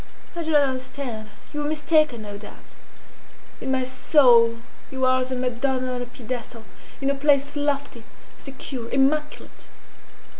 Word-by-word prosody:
I 340 Hz, -, -3 dB
do 320 Hz, -, -4 dB
not 295 Hz, -2 st, +5 dB
understand. 260 Hz, -4 st, -4 dB, 0.2 s
You 295 Hz, -, -2 dB
were 295 Hz, -, -1 dB
mistaken, 305 Hz, -5 st, +2 dB
no 205 Hz, -1 st, -7 dB
doubt. 205 Hz, +1 st, -12 dB, 0.9 s
In 265 Hz, -, -2 dB
my 260 Hz, -1 st, +1 dB
soul 245 Hz, -3 st, +4 dB, 0.3 s
you 265 Hz, -1 st, -1 dB
are 255 Hz, 0 st, +3 dB
as 255 Hz, +1 st, -1 dB
a -, -, 0 dB
Madonna 255 Hz, +1 st, -1 dB
on 250 Hz, -, -3 dB
a 245 Hz, -, -5 dB
pedestal, 240 Hz, -2 st, -7 dB, 0.4 s
in 275 Hz, 0 st, +2 dB
a -, -, +1 dB
place 280 Hz, 0 st, +2 dB
lofty, 285 Hz, -5 st, -2 dB, 0.3 s
secure, 260 Hz, -3 st, -7 dB
immaculate. 300 Hz, +3 st, -1 dB
260 Hz, 150 wpm, -24 LUFS, 245-285 Hz, 0.9 s, not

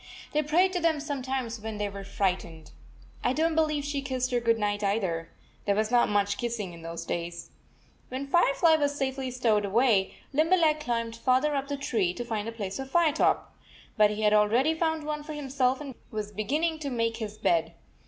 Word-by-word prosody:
They 300 Hz, -, +2 dB
prayed 350 Hz, +6 st, +2 dB
to 360 Hz, -, 0 dB
them 325 Hz, -3 st, +2 dB
sometimes 265 Hz, -5 st, -3 dB
when 220 Hz, 0 st, -5 dB
they 205 Hz, 0 st, -1 dB
were 200 Hz, 0 st, -7 dB
frightened. 180 Hz, -5 st, -2 dB, 0.5 s
I 250 Hz, -, +2 dB
don 320 Hz, +4 st, +2 dB
t -, -, -3 dB
believe 305 Hz, -3 st, +1 dB
she 290 Hz, -1 st, -2 dB
kissed 260 Hz, -1 st, -2 dB
her 245 Hz, -, +2 dB
good 230 Hz, -1 st, +2 dB
night, 205 Hz, -1 st, -1 dB
either. 185 Hz, -5 st, -1 dB, 0.4 s
There 200 Hz, -, +2 dB
was 215 Hz, +2 st, 0 dB
not 245 Hz, -1 st, +4 dB
much 200 Hz, -1 st, +1 dB
kissing 230 Hz, -7 st, -3 dB
in 170 Hz, -, -11 dB
those 165 Hz, +1 st, -6 dB
days.. 170 Hz, 0 st, -4 dB, 0.6 s
When 260 Hz, +2 st, -4 dB
Firefly 320 Hz, +1 st, +4 dB
was 285 Hz, -1 st, 0 dB
safely 265 Hz, -1 st, -2 dB
stowed 230 Hz, -4 st, +1 dB
away, 205 Hz, -1 st, +2 dB, 0.2 s
Limberleg 315 Hz, 0 st, +3 dB
climbed 230 Hz, -5 st, -2 dB
farther 260 Hz, +5 st, +2 dB
up 275 Hz, 0 st, -2 dB
the 285 Hz, 0 st, -3 dB
tree 215 Hz, -10 st, 0 dB
to 240 Hz, -, -4 dB
find 220 Hz, -2 st, -3 dB
a -, -, -3 dB
place 200 Hz, -4 st, -5 dB
for 270 Hz, -, -4 dB
Firetop. 315 Hz, +2 st, +2 dB, 0.4 s
But 210 Hz, -2 st, +5 dB
he 210 Hz, +1 st, -3 dB
had 210 Hz, 0 st, +4 dB
already 230 Hz, +9 st, +4 dB
found 320 Hz, -1 st, -1 dB
one 300 Hz, 0 st, -3 dB
for 305 Hz, +1 st, -7 dB
himself 265 Hz, -3 st, 0 dB
and 285 Hz, -3 st, -7 dB, 0.2 s
was 210 Hz, -1 st, -4 dB
beginning 300 Hz, -, -1 dB
to 290 Hz, -2 st, -3 dB
make 230 Hz, -2 st, -1 dB
his 215 Hz, -2 st, -6 dB
bed. 165 Hz, -3 st, +1 dB
245 Hz, 200 wpm, -28 LUFS, 210-290 Hz, 0.6 s, But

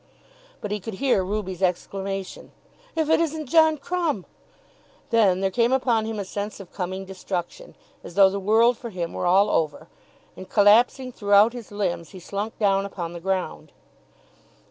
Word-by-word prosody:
But 205 Hz, -, -5 dB
he 210 Hz, -, -1 dB
could 210 Hz, +1 st, -7 dB
hear 245 Hz, -4 st, +1 dB
Ruby's 190 Hz, -2 st, -4 dB
exclamation, 195 Hz, +1 st, -3 dB, 0.4 s
"If 320 Hz, -2 st, 0 dB
it 320 Hz, -, +4 dB
isn't 315 Hz, -2 st, -1 dB
John 315 Hz, +2 st, +4 dB
Crumb!" 315 Hz, -, -2 dB, 0.9 s
Then 200 Hz, -5 st, +3 dB
there 195 Hz, 0 st, +1 dB
came 235 Hz, +3 st, +2 dB
upon 245 Hz, -4 st, +2 dB
him 220 Hz, -1 st, -4 dB
a 200 Hz, -, -3 dB
sense 205 Hz, +3 st, -5 dB
of 195 Hz, -3 st, -12 dB
coming 190 Hz, +1 st, -4 dB
destruction, 190 Hz, -, -6 dB, 0.3 s
as -, -, -10 dB
though 195 Hz, -1 st, +6 dB
the 200 Hz, -, -3 dB
world 225 Hz, +4 st, +3 dB
for 235 Hz, -, -6 dB
him 175 Hz, -5 st, -4 dB
were -, -, -2 dB
all 195 Hz, +3 st, +4 dB
over; 155 Hz, 0 st, -1 dB, 0.5 s
and, 185 Hz, 0 st, -10 dB
collapsing 235 Hz, +5 st, +4 dB
throughout 205 Hz, 0 st, +4 dB
his 240 Hz, -4 st, -9 dB
limbs, 185 Hz, -5 st, -3 dB
he 185 Hz, -, -9 dB
slunk 200 Hz, +5 st, -5 dB
down 195 Hz, -2 st, +2 dB
upon 175 Hz, -4 st, -6 dB
the 170 Hz, -, -7 dB
ground. 190 Hz, +1 st, -3 dB
200 Hz, 165 wpm, -24 LUFS, 190-235 Hz, 0.9 s, though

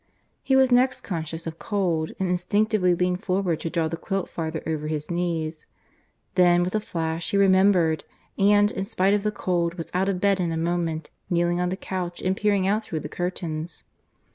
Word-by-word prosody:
He 265 Hz, -, +2 dB
was 265 Hz, -1 st, +5 dB
next 255 Hz, +1 st, +3 dB
conscious 165 Hz, -3 st, -5 dB
of 165 Hz, 0 st, -6 dB
cold, 175 Hz, -6 st, -1 dB
and 190 Hz, -, 0 dB
instinctively 180 Hz, +1 st, +2 dB
leaned 180 Hz, +2 st, 0 dB
forward 185 Hz, -4 st, 0 dB
to 165 Hz, -, -3 dB
draw 165 Hz, -1 st, 0 dB
the 165 Hz, +1 st, -4 dB
quilt 195 Hz, +2 st, -3 dB
farther 160 Hz, -1 st, -4 dB
over 155 Hz, -1 st, -2 dB
his 155 Hz, +1 st, -3 dB
knees. 165 Hz, -3 st, -2 dB, 0.7 s
Then, 175 Hz, -1 st, +5 dB
with 180 Hz, -, -3 dB
a 215 Hz, -, +2 dB
flash, 165 Hz, -4 st, -3 dB
he 200 Hz, -, +1 dB
remembered, 190 Hz, -4 st, +4 dB, 0.3 s
and, 205 Hz, +1 st, +4 dB
in 190 Hz, -, -3 dB
spite 195 Hz, -2 st, +1 dB
of 205 Hz, -, +2 dB
the 210 Hz, +1 st, 0 dB
cold, 170 Hz, -4 st, -1 dB
was 165 Hz, -2 st, -7 dB
out 190 Hz, +2 st, +1 dB
of 185 Hz, -2 st, -1 dB
bed 200 Hz, 0 st, +2 dB
in 175 Hz, -2 st, 0 dB
a 165 Hz, -, -2 dB
moment, 165 Hz, -1 st, -2 dB, 0.2 s
kneeling 175 Hz, 0 st, +1 dB
on 180 Hz, -, 0 dB
the 185 Hz, -, -3 dB
couch 180 Hz, -3 st, -4 dB
and 185 Hz, +1 st, 0 dB
peering 200 Hz, -2 st, +1 dB
out 210 Hz, +3 st, +1 dB
through 160 Hz, -7 st, -4 dB
the 150 Hz, -, -6 dB
curtains. 170 Hz, -2 st, -4 dB
180 Hz, 195 wpm, -25 LUFS, 165-195 Hz, 0.7 s, was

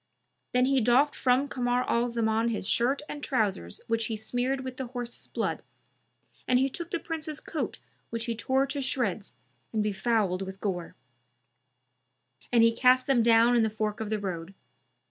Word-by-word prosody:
Then 250 Hz, 0 st, +3 dB
he 270 Hz, -1 st, +3 dB
doffed 250 Hz, +6 st, +4 dB
from 260 Hz, +2 st, +2 dB
Kamar 245 Hz, -1 st, 0 dB
al 235 Hz, +1 st, +2 dB
Zaman 225 Hz, -1 st, +1 dB
his 215 Hz, -4 st, -3 dB
shirt 265 Hz, +5 st, +2 dB
and 290 Hz, -1 st, -7 dB
trousers 200 Hz, -, -1 dB
which 230 Hz, 0 st, 0 dB
he 225 Hz, -, -2 dB
smeared 250 Hz, +5 st, -1 dB
with 260 Hz, -1 st, -6 dB
the 265 Hz, -, -4 dB
horse's 245 Hz, -1 st, -5 dB
blood -, -, -2 dB, 0.9 s
and 250 Hz, -, +4 dB
he 265 Hz, +2 st, +2 dB
took 340 Hz, +5 st, -5 dB
the -, -, -1 dB
Prince's 315 Hz, -2 st, -5 dB
coat 320 Hz, -, -4 dB, 0.3 s
which 230 Hz, 0 st, -2 dB
he 235 Hz, -, -1 dB
tore 265 Hz, +4 st, +1 dB
to 280 Hz, +1 st, -3 dB
shreds 225 Hz, -7 st, -2 dB, 0.4 s
and 215 Hz, -2 st, 0 dB
befouled 210 Hz, -2 st, 0 dB
with 190 Hz, 0 st, -6 dB
gore; 180 Hz, -5 st, -3 dB, 1.6 s
and 235 Hz, -2 st, +5 dB
he 230 Hz, 0 st, +4 dB
cast 255 Hz, +1 st, +4 dB
them 270 Hz, -4 st, +3 dB
down 230 Hz, +1 st, +5 dB
in 235 Hz, -, +4 dB
the 220 Hz, -, +2 dB
fork 215 Hz, -1 st, -2 dB
of 220 Hz, -2 st, -3 dB
the 215 Hz, -, 0 dB
road. 185 Hz, -2 st, -5 dB
235 Hz, 175 wpm, -28 LUFS, 220-260 Hz, 1.6 s, and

